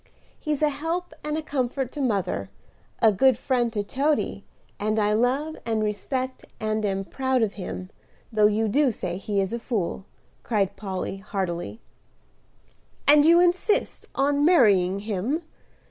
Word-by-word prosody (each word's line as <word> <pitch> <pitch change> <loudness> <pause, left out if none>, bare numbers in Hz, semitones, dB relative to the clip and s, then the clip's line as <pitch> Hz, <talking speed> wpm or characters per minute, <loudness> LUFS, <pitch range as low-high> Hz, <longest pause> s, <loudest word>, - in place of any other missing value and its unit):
He's 305 -1 -2
a 300 - +5
help 325 +5 -3
and 300 +1 -2
comfort 260 -2 -2
to 295 - -5
mother, 200 -8 -1 0.5
a 220 - +7
good 250 +4 +4
friend 245 -2 0
to 205 -2 -1
Toady, 280 +8 0 0.4
and 215 +1 0
I 210 -1 +2
love 265 +8 +1
and 220 -2 0
respect 255 +5 -3 0.2
and 215 0 -1
am 195 -1 -1
proud 260 +1 0
of 210 - -1
him, 185 -1 -6 0.4
though 210 -1 +5
you 215 +1 +1
do 275 +6 +3
say 180 -4 -4
he 200 +1 -2
is 195 +2 -1
a 235 - -2
fool," 205 -5 -2 0.4
cried 200 -5 0
Polly 190 -1 -4
heartily. 195 +1 -4 1.3
"And 295 +1 +7
you 340 +2 +7
insist 360 +4 +1
on 285 +1 +2
marrying 200 - +4
him?" 220 - -2
230 Hz, 145 wpm, -25 LUFS, 200-285 Hz, 1.3 s, a